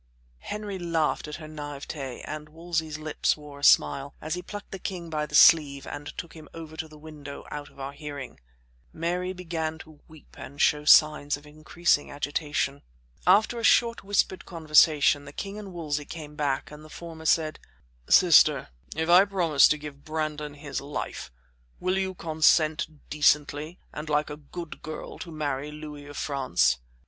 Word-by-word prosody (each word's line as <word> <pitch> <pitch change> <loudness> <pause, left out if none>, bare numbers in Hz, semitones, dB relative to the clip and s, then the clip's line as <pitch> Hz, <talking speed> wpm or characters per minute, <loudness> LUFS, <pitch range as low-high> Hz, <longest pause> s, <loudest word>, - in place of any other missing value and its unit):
Henry 205 - -5
laughed 165 -3 0
at 150 - -6
her 160 - -9
naïveté, 145 -3 -7
and 150 0 -6
Wolsey's 160 -1 -3
lips 155 0 0
wore 145 -1 -11
a - - -14
smile, 135 - +4
as 155 - -4
he 180 - -3
plucked 205 +3 -9
the 195 - -6
king 175 -3 -5
by 150 -1 -1
the 150 - -5
sleeve 145 -4 +6
and 145 0 -7
took 170 - -6
him 155 -3 -12
over 160 -1 -9
to 160 - -5
the 155 -1 -15
window, 150 -2 -10
out 145 -1 -6
of - - -20
our 135 +1 -4
hearing. 145 -3 -8 0.5
Mary 180 +3 -2
began 165 -3 -4
to 155 -1 -14
weep 155 -2 -17
and 140 +2 -10
show 150 0 +3
signs 150 -1 +5
of 145 - -17
increasing 155 +1 0
agitation. 145 -1 -2 0.5
After 215 +5 +4
a - - -6
short 235 +1 +4
whispered 195 -1 0
conversation, 155 -3 +4
the 140 - -9
king 200 +7 -6
and 200 -2 -8
Wolsey 150 -4 -3
came 150 -2 -9
back 145 -3 -1
and 150 0 -11
the 155 - -13
former 160 0 -9
said: 155 -1 +2 0.5
"Sister, 155 -5 +6 0.3
if 160 +1 -1
I 175 +2 +8
promise 170 -8 +4
to 150 - +1
give 145 -1 -10
Brandon 150 -1 -3
his 145 -2 -5
life, 140 - -5 0.5
will 185 +1 0
you 190 -1 -2
consent 155 -1 +3 0.2
decently 150 +2 +2 0.2
and 150 +1 -6
like 150 0 +1
a 150 - -6
good 165 +3 -9
girl 155 0 -7
to 170 - -7
marry 145 -2 -3
Louis 150 -1 -9
of 145 - -9
France?" 130 - +1
155 Hz, 175 wpm, -27 LUFS, 145-165 Hz, 0.5 s, I